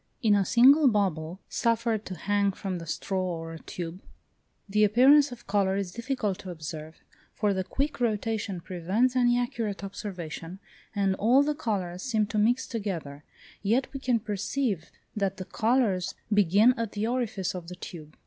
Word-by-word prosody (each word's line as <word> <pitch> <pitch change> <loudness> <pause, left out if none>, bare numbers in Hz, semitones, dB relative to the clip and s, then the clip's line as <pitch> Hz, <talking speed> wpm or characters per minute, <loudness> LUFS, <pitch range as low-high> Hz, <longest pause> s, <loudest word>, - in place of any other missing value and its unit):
In 215 -2 +5
a 200 -1 +4
single 265 - +6
bubble, 185 -6 0
suffered 230 -3 0
to 185 - -5
hang 200 +2 +1
from 185 -2 -4
the 165 - -9
straw 190 +4 -2
or 165 -2 -4
tube, 175 +3 -7 0.7
the 210 +1 +2
appearance 260 +7 +6
of 240 -1 -10
colour 195 -1 +1
is 195 -3 -3
difficult 235 -3 -2
to 190 - -8
observe, 155 -1 -8 0.3
for 210 -2 +1
the 190 -1 -1
quick 280 +9 -2
rotation 215 -4 -1
prevents 190 +8 0
any 245 -1 +4
accurate 225 -5 -2
observation, 180 -3 -6 0.4
and 195 -1 +2
all 250 +6 +5
the 300 +1 0
colours 190 -9 -3
seem 220 -4 +1
to 215 +1 -2
mix 240 +5 +2
together; 170 - -5 0.4
yet 230 +8 +1
we 275 - -4
can 250 -3 +1
perceive 210 - -2 0.3
that 195 -2 -1
the 185 - -6
colours 200 -3 +1 0.2
begin 205 +4 +5
at 230 -2 -3
the 210 +1 -1
orifice 225 -6 -1
of 180 -2 -7
the 180 - -7
tube. 155 -4 -10
205 Hz, 165 wpm, -28 LUFS, 185-235 Hz, 0.7 s, single